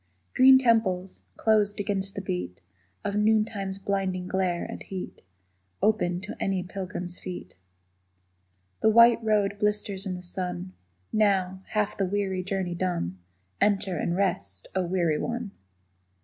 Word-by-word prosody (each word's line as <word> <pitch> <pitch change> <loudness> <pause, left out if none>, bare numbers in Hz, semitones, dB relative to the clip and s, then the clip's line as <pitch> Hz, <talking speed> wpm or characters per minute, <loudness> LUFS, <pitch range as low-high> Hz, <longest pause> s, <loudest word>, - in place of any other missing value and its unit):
Green 260 +1 +8
temples, 220 -7 +1 0.2
closed 210 -2 +2
against 195 -1 -2
the 195 - -3
beat 90 - -4 0.5
Of 200 - -1
noontime's 210 -2 +1
blinding 195 -2 -2
glare 185 -2 0
and - - -7
heat, 190 -2 -7 0.6
Open 205 -5 +2
to 190 - -7
any 190 -2 0
pilgrim's 180 -1 -6
feet. 175 - -7 1.3
The - - +4
white 235 +1 +6
road 205 -2 +1
blisters 210 -1 0
in 185 - -2
the 180 - -8
sun; 180 0 -4 0.4
Now, 190 -3 +2
half 210 -1 0
the 195 - 0
weary 190 -1 -1
journey 190 -2 -2
done, 170 - -2 0.4
Enter 195 -3 +2
and 170 +2 -1
rest, 100 - -1
Oh 185 -2 0
weary 170 -4 +1
one! 235 -3 -3
190 Hz, 135 wpm, -27 LUFS, 180-210 Hz, 1.3 s, Green